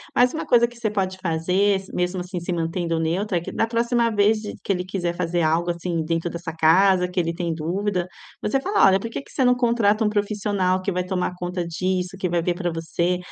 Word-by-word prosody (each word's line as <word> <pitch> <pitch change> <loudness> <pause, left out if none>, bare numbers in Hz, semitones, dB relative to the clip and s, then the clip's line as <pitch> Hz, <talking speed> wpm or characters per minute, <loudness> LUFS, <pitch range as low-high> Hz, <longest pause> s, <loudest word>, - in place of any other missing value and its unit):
Mas 250 +1 +5
uma 320 - -3
coisa 235 -1 +4
que 240 0 -15
você 225 -2 -1
pode 190 -2 -1
fazer, 185 +3 +1
se 190 - -13
mesmo, 180 +1 -1
assim, 180 0 -5
se 175 +1 -3
mantendo 165 0 -1
neutra, 180 +4 0
é - - -11
que, - - -7
da - - +1
próxima 235 0 +1
vez 210 +1 +3
de 210 - -6
que - - -1
ele 180 -1 -1
quiser 175 -2 -2
fazer 175 0 -1
algo 165 +2 +1
assim 170 -1 -2
dentro 165 +1 -1
da 170 - -5
sua 170 -1 -6
casa, 180 +3 +4
que 180 +1 -2
ele 170 -1 0
tem 170 -1 -2
dúvida, 180 +3 -2 0.3
você 270 +6 +1
fala: 400 - +3
"Olha, 195 0 +5
por 230 - -5
que 230 - -5
que - - -19
você 265 - 0
não 250 0 +5
contrata 230 -3 +2
um - - +3
profissional 205 -3 0
que 195 +1 -2
vai 180 0 -1
tomar 180 -1 -2
conta 180 0 -3
disso, 185 +2 -2
que 185 - -1
vai 170 0 +1
ver 175 - +1
para 175 0 -2
você?". 165 +2 -1
185 Hz, 245 wpm, -23 LUFS, 170-205 Hz, 0.3 s, Mas